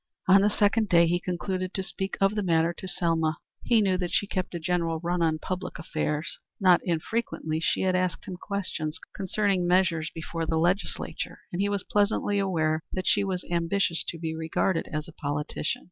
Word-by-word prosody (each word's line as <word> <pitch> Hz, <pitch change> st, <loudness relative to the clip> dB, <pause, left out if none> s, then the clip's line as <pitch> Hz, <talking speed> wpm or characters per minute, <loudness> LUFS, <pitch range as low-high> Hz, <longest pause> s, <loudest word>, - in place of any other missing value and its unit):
On 195 Hz, +1 st, +7 dB
the 205 Hz, -, +4 dB
second 210 Hz, +1 st, +2 dB
day 170 Hz, -1 st, +6 dB
he 175 Hz, +1 st, +1 dB
concluded 185 Hz, +1 st, -3 dB
to 190 Hz, -, -1 dB
speak 190 Hz, 0 st, -4 dB
of 195 Hz, 0 st, +3 dB
the 210 Hz, -, 0 dB
matter 165 Hz, -2 st, +2 dB
to 190 Hz, -, -8 dB
Selma. 165 Hz, -3 st, +1 dB, 0.2 s
He 230 Hz, -2 st, +3 dB
knew 185 Hz, -2 st, +2 dB
that 180 Hz, -2 st, -2 dB
she -, -, +2 dB
kept 185 Hz, -3 st, -3 dB
a -, -, -2 dB
general 165 Hz, -1 st, 0 dB
run 175 Hz, +1 st, -1 dB
of 160 Hz, -1 st, +2 dB
public 185 Hz, -1 st, -4 dB
affairs. 155 Hz, -1 st, -2 dB, 0.2 s
Not 185 Hz, -3 st, +5 dB
infrequently 165 Hz, -2 st, -1 dB
she 165 Hz, -, +1 dB
had 185 Hz, -1 st, +2 dB
asked 185 Hz, -1 st, 0 dB
him 180 Hz, -, -5 dB
questions 180 Hz, -5 st, -3 dB, 0.2 s
concerning 195 Hz, -1 st, +1 dB
measures 175 Hz, -3 st, +2 dB
before 165 Hz, 0 st, -4 dB
the 160 Hz, -, +1 dB
Legislature, 175 Hz, +4 st, -1 dB
and 180 Hz, -, -1 dB
he 200 Hz, -, +2 dB
was 200 Hz, -2 st, -1 dB
pleasantly 205 Hz, 0 st, +1 dB
aware 160 Hz, -5 st, +1 dB
that 185 Hz, 0 st, -3 dB
she 205 Hz, -, +3 dB
was 185 Hz, -2 st, -2 dB
ambitious 170 Hz, 0 st, +1 dB
to 170 Hz, -, -4 dB
be 160 Hz, -1 st, -3 dB
regarded 160 Hz, +2 st, 0 dB
as 155 Hz, -1 st, -3 dB
a 170 Hz, -, -11 dB
politician. 150 Hz, +1 st, -2 dB
180 Hz, 190 wpm, -27 LUFS, 165-195 Hz, 0.2 s, On